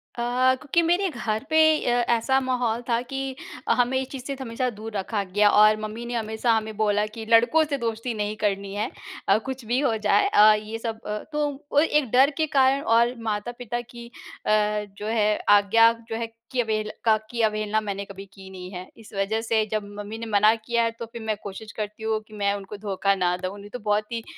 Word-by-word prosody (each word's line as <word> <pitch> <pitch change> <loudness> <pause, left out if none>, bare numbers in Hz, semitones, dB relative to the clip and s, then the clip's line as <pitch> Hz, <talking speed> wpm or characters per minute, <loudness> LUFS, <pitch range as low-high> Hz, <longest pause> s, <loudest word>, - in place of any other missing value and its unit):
अ, 250 +2 +2
क्योंकि 310 +3 +2
मेरे 350 +3 +2
घर 220 -7 -3
पे 315 0 +4 0.3
अ, - - +2 0.2
ऐसा 265 +4 +2
माहौल 245 -3 -1
था 230 0 +2
कि 270 +1 -5 0.3
हमें 250 +1 +2
इस 265 - -4
चीज़ 265 -3 -7
से 275 -1 -3
हमेशा 250 0 -2
दूर 220 -1 -8
रखा 200 +2 -2
गया 205 +2 +3
और 215 +1 +6
मम्मी 215 +2 -5
ने 240 - -5
हमेशा 220 +1 0
हमें 220 -1 -1
बोला 210 -1 +2
कि 225 0 -7
लड़कों 240 +8 +5
से 285 -2 -2
दोस्ती 230 0 -3
नहीं 210 -1 -2
करनी 200 -1 -1
है 215 +3 -1 0.4
अ, 200 - +6
कुछ 265 -1 -5
भी 245 +4 +1
हो 255 -6 +1
जाए 215 - +3
अ, 215 - +7
ये 215 +1 -4
सब। 225 -1 -4
अ, 210 0 -2
तो 300 0 0 0.2
वो 290 - +4
एक 300 -5 +2
डर 265 +3 +6
के 315 - +1
कारण 270 +1 +4
और 235 +1 +3
माता-पिता 240 +3 -3
की 240 0 -11 0.4
अ, - - +1 0.5
जो 210 - -5
है 215 -2 +2
आज्ञा 205 +3 +6 0.2
जो 225 - -3
है 230 0 -4 0.2
कि 255 - -2
अवहेल 215 -2 -2
का 220 -1 +5 0.2
की 235 - -2
अवहेलना 215 0 +1
मैंने 200 -1 -4
कभी 195 0 -10
की 190 -1 -12
नहीं 180 -1 -8
है। 180 -1 -8
इस 225 - -15
वज़ह 200 +3 -1
से 225 -1 +1
जब 215 -1 -1 0.2
मम्मी 205 +2 -6
ने 230 - -6
मना 210 +2 +5
किया 235 +1 -1
है 230 - +1
तो 230 - -4
फिर 235 -1 -8
मैं 220 -1 -1
कोशिश 205 +2 -8
करती 210 0 -5
हूँ 220 0 0
कि 215 - -19
मैं 200 0 +1
उनको 200 0 -7
धोखा 200 -1 0
ना 180 -1 +1
दूँ 185 +2 -5
नहीं 205 - -11
तो 250 - -7
बहुत 210 +1 -1
ही 230 -1 -3
220 Hz, 220 wpm, -25 LUFS, 210-245 Hz, 0.5 s, अ